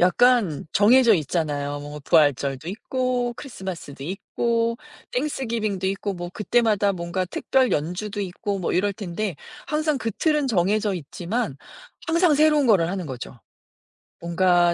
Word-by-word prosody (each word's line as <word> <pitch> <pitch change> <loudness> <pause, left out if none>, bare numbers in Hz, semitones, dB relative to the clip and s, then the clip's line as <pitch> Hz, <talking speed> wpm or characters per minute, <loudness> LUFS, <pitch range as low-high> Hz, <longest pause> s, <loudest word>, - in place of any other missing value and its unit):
약간 195 - +3
정해져 235 +3 +6
있잖아요. 145 -4 -1
뭐 145 +1 -8
부활절도 145 -1 +2
있고, 245 +3 -1
크리스마스도 190 - -7
있고, 230 +7 -1 0.3
땡스기빙도 230 -8 -1
있고, 195 +1 -2
뭐 175 -1 -6
그때마다 210 -2 +2
뭔가 175 +1 -2
특별 260 +7 +1
연주도 180 +7 -2
있고 195 +2 -3
뭐 175 - -1
이럴 200 +2 +1
텐데 195 -2 -4 0.3
항상 305 -1 0
그 230 - -2
틀은 300 - +1
정해져 205 -1 +1
있지만 180 - -3 0.5
항상 335 0 +3
새로운 300 -1 +4
거를 190 -8 +4
하는 185 0 -3
거죠. 130 -3 -7 0.8
뭔가 175 0 +3
195 Hz, 300 characters per minute, -24 LUFS, 170-240 Hz, 0.8 s, 정해져